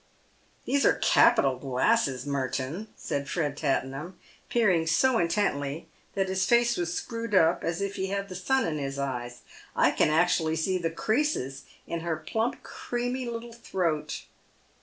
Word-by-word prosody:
" - - -35
These 280 0 +2
are - - +5
capital 135 -2 +4
glasses, 135 - +1
Merton," 140 +7 -2
said 140 -1 -3
Fred 150 -5 -1
Tattenham, 140 +4 -2 0.3
peering 185 -9 +2
so 230 +9 +3
intently 165 -5 -1 0.3
that 195 -1 +1
his 190 0 0
face 235 +3 +3
was 175 -2 -2
screwed 230 +3 -3
up 165 -2 +4
as 170 +2 -2
if 200 0 -3
he 190 - -1
had 200 +1 -2
the 190 - -8
sun 260 +9 +1
in 155 -2 -2
his 135 -1 -4
eyes. 125 -3 -4 0.2
" - - -21
I - - +4
can - - +2
actually 160 0 +2
see 185 +4 0
the 165 -1 -1
creases 165 - -1 0.2
in 170 - -3
her 165 -1 -2
plump, 220 +9 -2
creamy 245 +1 -3
little 235 0 -6
throat." 180 -9 -2
170 Hz, 160 wpm, -28 LUFS, 145-220 Hz, 0.3 s, are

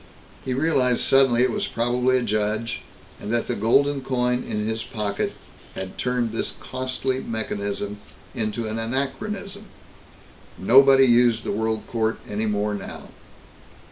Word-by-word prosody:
He 130 -1 -2
realized 130 -4 +2
suddenly 135 -3 +4
it 130 - +2
was - - -2
probably 125 +2 +1
a 125 - 0
judge, 110 +1 -1 0.4
and 105 - -5
that 120 -1 +1
the - - -2
golden 135 +6 +2
coin 125 -1 0
in 105 0 -3
his 110 +1 -2
pocket 105 -3 -3 0.4
had 95 0 -7
turned 125 -2 0
this 115 - -3
costly 130 0 -3
mechanism 105 -2 -3 0.3
into 110 -1 -2
an 110 +1 -3
anachronism. 140 - -3 0.9
Nobody 135 +6 +6
used 120 -2 +4
the - - -2
World 110 +1 -1
Court 110 -1 -1
any 105 +1 -2
more 105 0 0
now. 100 - -7
120 Hz, 140 wpm, -24 LUFS, 110-130 Hz, 0.9 s, Nobody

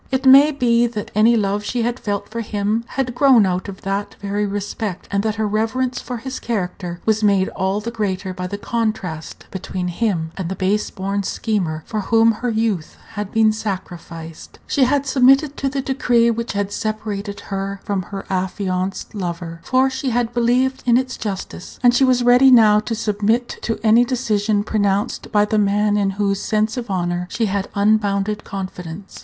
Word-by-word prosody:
It 265 0 -1
may 275 +3 +8
be 240 -4 +2
that 215 -3 -6
any 220 +3 +5
love 205 0 0
she 240 +2 -1
had 240 +2 -2
felt 205 -1 -3
for 230 +1 -4
him 210 +1 -1
had 255 -2 -2
grown 250 -4 +5
out 185 +1 -2
of 195 - -9
that 195 +1 -3
very 205 +1 -1
respect, 200 -1 -4
and 200 0 +1
that 215 0 -1
her 220 0 -1
reverence 225 +5 -1
for 250 - -5
his 260 +3 -6
character 180 -5 -3
was 220 0 +1
made 200 -2 +3
all 190 +2 -1
the 230 +2 -5
greater 190 -4 -2
by 180 0 -4
the 200 - -5
contrast 205 -8 -3
between 185 -1 -4
him 175 -4 -1
and 185 -3 -4
the 190 - -3
base 200 +3 0
born 195 +1 -2
schemer 185 -7 -2
for 215 - -3
whom 225 +3 +4
her 240 +3 -3
youth 220 -7 -1
had 210 -3 -5
been 220 -1 +4
sacrificed. 175 -6 -7
She 270 - +2
had 280 +2 +1
submitted 270 +2 +4
to 275 - -1
the 275 0 -2
decree 245 -4 +2
which 230 -1 -3
had 200 0 -2
separated 205 -1 -4
her 195 0 -3
from 200 -2 -1
her 195 +2 -7
affianced 185 0 -2
lover, 170 -4 -5
for 260 +6 +3
she 265 0 -2
had 240 -1 0
believed 250 +2 +1
in 240 0 +5
its 255 0 -2
justice; 195 -3 -6
and 245 0 +6
she 245 - +3
was 255 -2 +3
ready 245 +2 +6
now 220 -4 +7
to 225 +2 -3
submit 220 +2 0
to 225 - -2
any 225 +2 +6
decision 215 -5 0
pronounced 205 -1 -1
by 210 0 +4
the 215 0 +1
man 205 +1 +2
in 200 -1 +2
whose 200 -1 0
sense 215 0 0
of 245 -3 -5
honor 175 -1 -1
she 225 - -1
had 200 -1 -2
unbounded 205 0 +1
confidence. 185 -1 -7
210 Hz, 185 wpm, -20 LUFS, 195-235 Hz, -, may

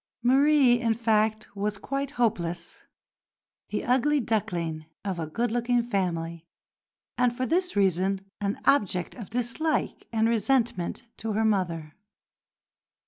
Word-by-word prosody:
Marie, 265 -1 +5
in 230 -2 +2
fact, 215 -2 +1
was 205 +1 -1
quite 275 +6 -3
hopeless, 175 -7 -1 0.9
the - - -2
"ugly 265 +4 +3
duckling" 175 - -2 0.2
of 190 -3 -2
a 160 - -3
good 230 +9 -1
looking 240 0 +1
family, 170 -7 -2 0.8
and 245 -1 +2
for 255 - 0
this 360 +5 0
reason 190 0 +2 0.2
an 200 0 -1
object 190 -10 +2
of 225 -6 -9
dislike 245 +7 -1
and 225 -1 +2
resentment 230 -4 0
to 220 -1 -3
her 220 +2 +1
mother. 170 -7 0
220 Hz, 125 wpm, -27 LUFS, 185-245 Hz, 0.9 s, Marie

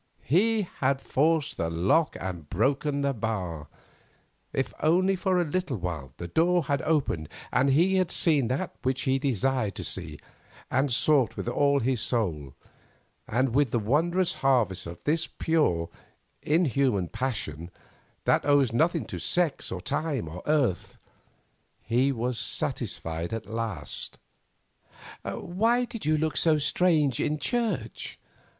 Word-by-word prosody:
He 215 - +3 0.2
had 135 0 +2
forced 155 +2 +1
the 85 - -1
lock 95 - +2
and 90 -6 -6
broken 140 - 0
the 140 0 +1
bar; 95 - -3 0.8
if 135 - -2
only 185 +5 +3
for 185 0 +1
a 175 - +1
little 155 -4 -2
while, 85 -8 -5
the 85 - -6
door 175 - +2
had 140 0 -1
opened, 135 - 0 0.2
and 130 +3 +3
he 175 +8 +3
had 185 -3 +2
seen 150 -7 +3
that 130 +3 -2
which 130 +1 -1
he 135 -1 +1
desired 130 -4 0
to - - -5
see - - -5 0.5
and 130 +1 +1
sought 135 0 +3
with - - -4
all 140 +3 +2
his 125 -1 0
soul, 80 - -1 0.7
and 125 +2 +1
with 140 0 +3
the 120 - 0
wondrous 165 - +1
harvest 110 -10 +2
of 85 0 -7
this 160 +2 0
pure, 145 - +1 0.5
inhuman 140 - +1
passion, 85 - -4 0.6
that - - +3
owes 140 -4 +3
nothing 160 +8 +2
to - - -6
sex, 175 -5 +1
or 90 - -4
time, 145 - -2
or 85 +3 -7
earth, 140 - 0 0.9
he 125 +4 +2
was 125 -1 -2
satisfied 85 +3 -3
at 115 0 -4
last. 115 -4 -3 1.0
"Why 230 +8 0
did 230 -9 -7
you 155 0 +3
look 155 0 -1
so 160 -2 +4
strange 150 -3 +2
in 150 - 0
church?" 205 - -2
135 Hz, 140 wpm, -27 LUFS, 110-160 Hz, 1.0 s, so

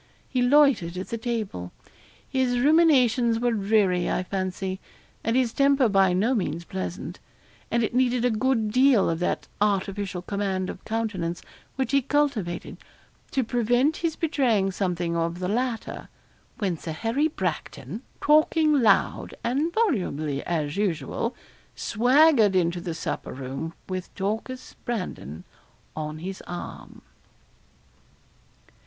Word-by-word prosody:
He 255 - -1
loitered 245 - +4
at 185 - -5
the 230 - -2
table. 215 - -3 0.6
His 255 -2 +1
ruminations 255 -5 +4
were 240 0 +1
dreary, 200 -4 +2
I 185 - 0
fancy, 185 0 -3 0.4
and 225 +2 0
his 250 -3 +2
temper 275 -2 +4
by 195 -3 +4
no 205 +8 +2
means 170 -7 -2
pleasant; 90 - -5 0.5
and 235 0 +1
it 220 - -1
needed 250 -1 +2
a 250 - +3
good 225 -1 +1
deal 255 -2 +5
of 165 - -2
that 180 - -1
artificial 195 -2 0
command 190 -2 -2
of - - -12
countenance 210 -7 -2 0.3
which 265 -3 -1
he 275 0 +4
cultivated, 260 -11 -1 0.5
to 265 - 0
prevent 245 +5 +2
his 330 -2 -1
betraying 245 - +1
something 175 -3 -1
of 170 +1 -1
the 180 0 -3
latter, 235 +3 -2 0.5
when 185 -7 -1
Sir 160 - -5
Harry 230 - +1
Bracton, 180 - -4 0.2
talking 305 -1 +4
loud 210 -4 +2
and 275 +8 0
volubly 180 - 0
as 155 -3 -2
usual, 205 +5 -1 0.4
swaggered 245 -2 +4
into 175 -1 +1
the 170 -2 -4
supper - - -4
room, 135 +5 -5
with 185 -1 -5
Dorcas 220 +6 -4
Brandon 180 - -4 0.5
on 155 0 -4
his 185 +4 -6
arm. 175 - -8
215 Hz, 130 wpm, -25 LUFS, 180-255 Hz, 0.6 s, deal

